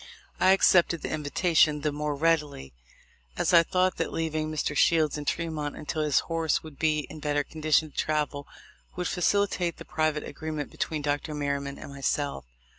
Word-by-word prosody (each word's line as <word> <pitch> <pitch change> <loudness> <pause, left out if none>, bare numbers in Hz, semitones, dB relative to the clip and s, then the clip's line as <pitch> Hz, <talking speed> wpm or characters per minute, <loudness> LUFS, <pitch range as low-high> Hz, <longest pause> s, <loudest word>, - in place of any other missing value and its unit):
I 185 +1 +6
accepted 175 -3 +4
the - - -3
invita 155 +3 -1
tion 150 -1 +5
the 150 - 0
more 150 0 -2
readily, 150 - 0 0.6
as - - +1
I 170 - +9
thought 185 +2 +1
that - - -2
leaving 155 -1 -2
Mr. 150 -1 -2
Shields 155 -1 +3
in 150 -1 -5
Tremont 155 -2 -2
until 155 +1 -3
his 150 -3 +2
horse 165 -2 -1
would 155 -3 -12
be 155 -1 +2
in 155 - -9
better 145 -1 0
condition 155 0 +1
to - - -30
travel 150 -2 -1 0.5
would 180 0 -2
facilitate 180 -2 0
the - - -10
pri 155 0 +1
vate 150 -1 -4
agreement 155 0 -5
between 155 -2 -3
Dr. 145 +1 -2
Merryman 140 -1 -2
and - - -9
myself. 140 - -2
155 Hz, 180 wpm, -27 LUFS, 145-165 Hz, 0.6 s, I